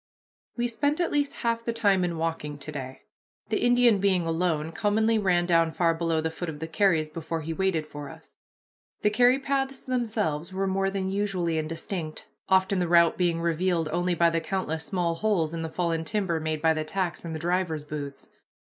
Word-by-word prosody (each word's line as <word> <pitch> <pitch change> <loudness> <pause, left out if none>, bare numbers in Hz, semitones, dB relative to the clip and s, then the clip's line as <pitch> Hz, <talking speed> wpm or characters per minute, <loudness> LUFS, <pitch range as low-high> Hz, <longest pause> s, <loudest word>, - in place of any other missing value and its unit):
We 240 0 +1
spent 285 +7 0
at 345 - +1
least 285 -1 +1
half 230 0 +1
the 235 - -1
time 200 -5 +3
in 170 -2 -1
walking 160 -3 -3
to 140 - -8
day. 130 -2 -7 0.5
The 220 - 0
Indian, 245 -3 +5
being 190 -3 +2
alone, 165 -1 0
commonly 220 +3 +2
ran 180 -3 +2
down 165 -2 +3
far 170 -2 +2
below 165 -1 0
the 160 0 -2
foot 170 +1 -5
of 155 - -6
the 160 +2 -5
carries 165 -2 +2
before 160 +1 -4
he 160 +1 -4
waited 175 -3 0
for 145 -2 -8
us. - - -14 0.7
The 210 - +4
carry 245 +4 +5
paths 270 -1 -2
themselves 215 - -1
were 190 +1 -1
more 195 0 +1
than 190 -1 -2
usually 185 -5 0
indistinct, 160 +1 -4 0.2
often 190 0 +3
the 175 - +1
route 170 -1 +5
being 170 -2 +1
revealed 170 -1 0
only 175 +1 +1
by 170 0 +4
the 165 0 0
countless 160 -5 -2
small 175 -3 0
holes 165 -4 0
in 165 - -3
the 160 - -3
fallen 165 -1 -1
timber 185 -3 -1
made 155 0 -3
by 160 0 +5
the 155 0 -2
tacks 175 +2 -3
in 165 -1 -5
the - - -3
drivers' 170 -2 -1
boots. 145 -2 -7
175 Hz, 200 wpm, -27 LUFS, 160-200 Hz, 0.7 s, Indian